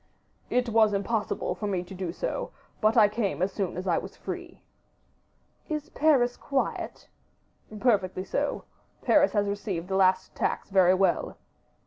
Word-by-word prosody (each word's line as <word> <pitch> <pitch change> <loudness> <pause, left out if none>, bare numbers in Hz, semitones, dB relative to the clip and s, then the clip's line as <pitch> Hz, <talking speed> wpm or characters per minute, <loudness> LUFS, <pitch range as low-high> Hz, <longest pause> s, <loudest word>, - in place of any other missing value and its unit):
"It 245 -1 +1
was 220 -2 +4
impossible 205 +2 -1
for 210 - -4
me 185 -3 -1
to 180 - -11
do 185 -2 -4
so; - - -3 0.3
but 215 +2 +3
I 215 -2 +8
came 200 -7 -1
as 190 - 0
soon 190 -4 -2
as 185 - -4
I 175 -3 +2
was - - -10
free." - - -7 1.1
"Is 305 -2 -4
Paris 265 -6 +3
quiet?" 275 -2 -3 0.7
"Perfectly 195 -6 +1
so. - - -2 0.4
Paris 295 -1 +4
has 205 -1 +2
received 200 -4 -3
the 190 - 0
last 185 -1 +3
tax - - -2
very 185 -1 +5
well." 190 +1 +1
200 Hz, 150 wpm, -27 LUFS, 185-230 Hz, 1.1 s, I